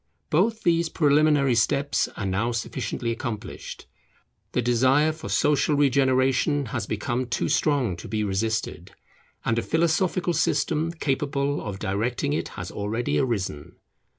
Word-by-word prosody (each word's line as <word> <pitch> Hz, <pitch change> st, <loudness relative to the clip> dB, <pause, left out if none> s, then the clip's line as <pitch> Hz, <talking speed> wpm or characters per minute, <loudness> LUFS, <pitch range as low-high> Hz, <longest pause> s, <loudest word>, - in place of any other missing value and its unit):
Both 220 Hz, +8 st, +2 dB
these 170 Hz, -1 st, +2 dB
preliminary 145 Hz, -3 st, +3 dB
steps 140 Hz, +5 st, +1 dB
are 100 Hz, -, -3 dB
now 100 Hz, +6 st, 0 dB
sufficiently 115 Hz, +1 st, -3 dB
accomplished. 115 Hz, -3 st, -6 dB, 0.7 s
The -, -, +1 dB
desire 130 Hz, +6 st, +3 dB
for 155 Hz, +1 st, -8 dB
social 150 Hz, 0 st, +2 dB
regeneration 135 Hz, +1 st, +2 dB
has 120 Hz, -5 st, -2 dB
become 120 Hz, +4 st, -2 dB
too 115 Hz, -, -1 dB
strong 135 Hz, -, +1 dB
to 85 Hz, -, -9 dB
be 110 Hz, -1 st, -1 dB
resisted, 110 Hz, +2 st, -2 dB, 0.5 s
and 115 Hz, 0 st, +1 dB
a -, -, 0 dB
philosophical 170 Hz, +3 st, +1 dB
system 160 Hz, 0 st, +1 dB
capable 145 Hz, -2 st, -1 dB
of 100 Hz, -2 st, -5 dB
directing 115 Hz, +9 st, -1 dB
it -, -, -1 dB
has 90 Hz, -1 st, -5 dB
already 110 Hz, +4 st, -1 dB
arisen. 100 Hz, -, -2 dB
130 Hz, 130 wpm, -25 LUFS, 115-150 Hz, 0.7 s, preliminary